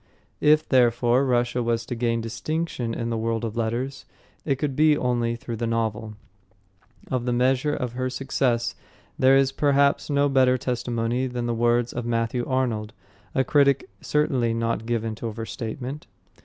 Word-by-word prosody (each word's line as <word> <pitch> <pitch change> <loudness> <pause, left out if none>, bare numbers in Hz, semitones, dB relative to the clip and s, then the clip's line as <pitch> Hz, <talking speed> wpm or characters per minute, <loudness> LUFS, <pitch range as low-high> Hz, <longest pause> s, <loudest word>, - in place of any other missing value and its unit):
If, 155 +1 +4
therefore, 120 0 +3
Russia 120 0 +1
was 115 -1 -1
to - - -4
gain 115 -1 0
distinction 125 0 -3
in 115 0 -3
the 115 - -1
world 115 0 -1
of 110 -1 -5
letters, 120 +4 -2 0.4
it 140 - +1
could 135 0 -2
be 150 0 +4
only 120 -2 0
through 120 -1 -6
the 115 - -2
novel. 110 -1 -2 1.0
Of 125 -2 -1
the 125 - 0
measure 130 +4 +2
of 125 -3 -3
her 130 +1 -2
success 125 -2 0 0.5
there 130 +1 +6
is 135 -1 +3
perhaps 140 +1 +2
no 145 0 +3
better 130 -2 +3
testimony 120 0 -1
than 125 -1 -3
the 120 - 0
words 120 +1 +1
of 120 -1 -4
Matthew 115 +1 0
Arnold, 115 -5 -1 0.4
a 130 - +3
critic 140 -1 +2
certainly 130 -6 +1
not 115 -1 -2
given 115 -2 -1
to 115 +2 -5
overstatement. 115 +5 -6
120 Hz, 160 wpm, -24 LUFS, 115-135 Hz, 1.0 s, there